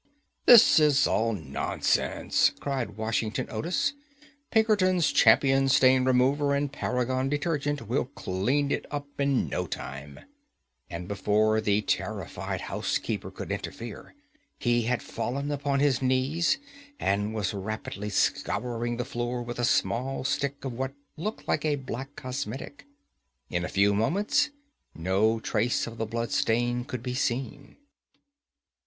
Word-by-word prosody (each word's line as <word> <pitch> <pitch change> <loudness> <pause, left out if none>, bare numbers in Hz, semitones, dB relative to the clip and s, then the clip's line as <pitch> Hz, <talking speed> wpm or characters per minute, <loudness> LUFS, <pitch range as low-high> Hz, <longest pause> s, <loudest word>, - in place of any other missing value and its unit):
"That 230 -7 +9
is 145 -2 +4
all 115 +2 +1
nonsense," 80 -9 0
cried 130 -7 -3
Washington 110 0 -1
Otis; 175 - 0 0.6
"Pinkerton's 200 -6 +3
Champion 135 +4 +5
Stain 130 0 +5
Remover 135 +3 +3
and 140 0 -1
Paragon 130 0 -1
Detergent 145 - -1
will 125 +4 0
clean 130 +5 -1
it - - -2
up 145 0 -4
in 140 -2 +2
no - - -2
time," 70 +1 -7 0.7
and 85 0 -6
before 105 +2 +2
the 105 0 +1
terrified 95 -1 -3
housekeeper - - -2
could - - -7
interfere, 115 - -6 0.4
he 120 -1 +2
had 125 +1 0
fallen 140 +4 -3
upon 140 -1 0
his 140 -3 +2
knees, 130 - +2 0.4
and 105 +2 0
was 105 -3 -1
rapidly 105 0 -5
scouring 120 +3 -1
the 125 - -2
floor 120 -1 -3
with 120 0 -6
a - - 0
small 130 +2 +1
stick 140 +1 -2
of 130 - -3
what 135 +3 -4 0.2
looked 195 +8 -5
like - - 0
a 150 -2 +2
black 135 +1 -6
cosmetic. 130 - -6 0.6
In 90 -1 -1
a - - -3
few 100 +1 +3
moments 165 - +2 0.5
no 100 +7 +1
trace 110 +2 0
of 115 -1 -9
the 115 - -1
blood 115 +1 -3
stain 120 +2 +1
could 125 -3 -6
be 125 0 -3
seen. 130 +2 -3
125 Hz, 135 wpm, -27 LUFS, 110-140 Hz, 0.7 s, That